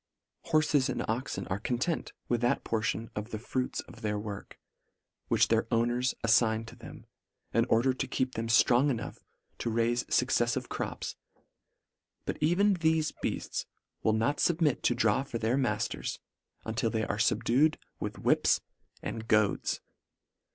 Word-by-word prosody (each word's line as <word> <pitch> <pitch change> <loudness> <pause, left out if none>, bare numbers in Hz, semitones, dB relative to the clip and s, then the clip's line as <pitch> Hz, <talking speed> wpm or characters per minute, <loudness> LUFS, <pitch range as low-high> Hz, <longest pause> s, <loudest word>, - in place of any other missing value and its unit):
Horfes 155 -3 +3
and - - -2
oxen 110 -4 -2
are 95 - -2
content 125 +9 -1 0.2
with 120 -1 0
that 120 - +1
portion 115 0 -1
of 105 +2 -4
the 110 - -4
fruits 125 +3 -2
of 115 - -14
their 105 -2 -1
work, 105 -1 -7 0.7
which - - +3
their 115 0 +2
owners 120 +2 +1
af 115 - +3
fign 110 0 +3
to 115 - -11
them, - - -11 0.5
in - - +3
order 125 +4 +3
to 135 +1 -3
keep 130 0 -1
them 115 +1 -3
ftrong 120 +4 +5
enough 120 -5 -3 0.4
to 120 - -1
raife 115 +1 +1
fuccefiive - - +1
crops; - - -4 1.1
but - - -3
even 185 +7 +4
thefe 160 -1 +2
hearts - - -3 0.3
will 110 - +2
not 115 +7 +1
fubmit 160 -5 +2
to 120 - +2
draw 115 0 +3
for 135 -4 -4
their 115 +2 +1
mafters, 135 -3 -1 0.5
until 110 +1 0
they 110 -1 -1
are 105 - -2
fubdued 125 +7 +3 0.2
with - - -4
whips - - +3 0.4
and 110 0 -5
goads. 105 -3 +2
120 Hz, 150 wpm, -30 LUFS, 110-130 Hz, 1.1 s, ftrong